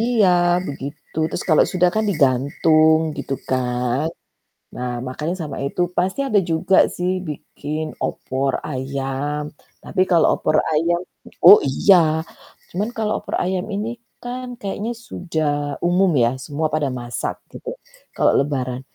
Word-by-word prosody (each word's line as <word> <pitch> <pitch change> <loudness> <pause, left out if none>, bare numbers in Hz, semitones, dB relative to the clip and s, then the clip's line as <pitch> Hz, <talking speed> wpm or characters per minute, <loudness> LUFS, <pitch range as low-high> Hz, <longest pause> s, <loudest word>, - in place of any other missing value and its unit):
iya 230 -4 +3 0.4
begitu, 140 +2 -8
terus - - -4
kalau 155 - +5
sudah 180 0 +3
kan 220 0 +1
digantung 155 +2 +3 0.2
gitu 135 - -3 0.2
kan. 125 +2 0 0.7
Nah 125 0 -3 0.2
makannya 150 +7 -3
sama 150 -3 -5
itu. 160 +6 -2 0.2
Pasti 185 +7 0
ada 215 -6 +4
juga 165 +4 +2 0.2
sih 180 +1 0 0.2
bikin 150 +1 -5 0.2
opor 135 +1 -2 0.2
ayam, 135 +2 -3 0.4
tapi - - -1
kalau 170 -3 +5
opor 155 - +1 0.2
ayam 170 +3 +2 0.4
oh 210 - +11
iya, 190 +8 +5 0.8
cuman 205 +5 -2
kalau 220 -1 -1
opor - - -4
ayam 185 0 -1
ini 210 +3 -2 0.3
kan 250 +1 -5
kayaknya 205 +3 -3 0.2
sudah 160 -4 -2 0.3
umum 180 +2 +3
ya, 115 - +3
semua 155 +1 -1
pada 155 -2 +1
masak 120 0 -4 0.2
gitu, 470 - -8 0.5
kalau - - +3
lebaran. 130 -3 -2
155 Hz, 135 wpm, -21 LUFS, 135-185 Hz, 0.8 s, oh